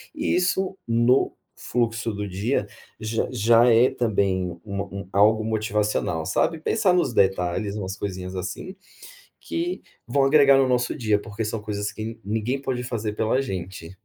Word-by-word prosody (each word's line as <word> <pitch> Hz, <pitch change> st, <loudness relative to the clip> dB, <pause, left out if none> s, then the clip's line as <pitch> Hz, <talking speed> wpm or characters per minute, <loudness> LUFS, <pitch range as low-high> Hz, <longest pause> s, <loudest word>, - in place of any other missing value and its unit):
isso 190 Hz, -7 st, 0 dB
no 120 Hz, +3 st, +3 dB, 0.2 s
fluxo 115 Hz, -1 st, -1 dB
do 105 Hz, 0 st, -4 dB
dia, 100 Hz, +4 st, -1 dB, 0.3 s
j 110 Hz, +1 st, -1 dB
já 115 Hz, +1 st, +4 dB
é, 120 Hz, +3 st, +5 dB
também, 95 Hz, -6 st, 0 dB
uma 100 Hz, -1 st, -3 dB
um 100 Hz, -1 st, -8 dB
algo 110 Hz, +2 st, +4 dB
motivacional, 105 Hz, -6 st, -1 dB
sabe. 140 Hz, -, 0 dB
Pensar 200 Hz, +3 st, +2 dB
nos 175 Hz, -9 st, +1 dB
detalhes, 95 Hz, +1 st, +1 dB
umas 100 Hz, -1 st, -4 dB
coisinhas, 95 Hz, -2 st, -5 dB
assim, 95 Hz, -, -5 dB, 0.7 s
que 345 Hz, +2 st, -3 dB, 0.2 s
vão 135 Hz, +3 st, +2 dB
agregar 140 Hz, -1 st, +6 dB
no 135 Hz, -, +4 dB
nosso 125 Hz, -1 st, 0 dB
dia 110 Hz, -3 st, +2 dB
porque 110 Hz, +1 st, -5 dB
são 110 Hz, 0 st, -3 dB
coisas 105 Hz, 0 st, -3 dB
que 110 Hz, +1 st, -6 dB
ninguém 110 Hz, +6 st, -1 dB
pode 130 Hz, -3 st, -2 dB
fazer 110 Hz, -4 st, -3 dB
pela 110 Hz, +5 st, +1 dB
gente. 90 Hz, -7 st, -5 dB
110 Hz, 150 wpm, -24 LUFS, 100-125 Hz, 0.7 s, agregar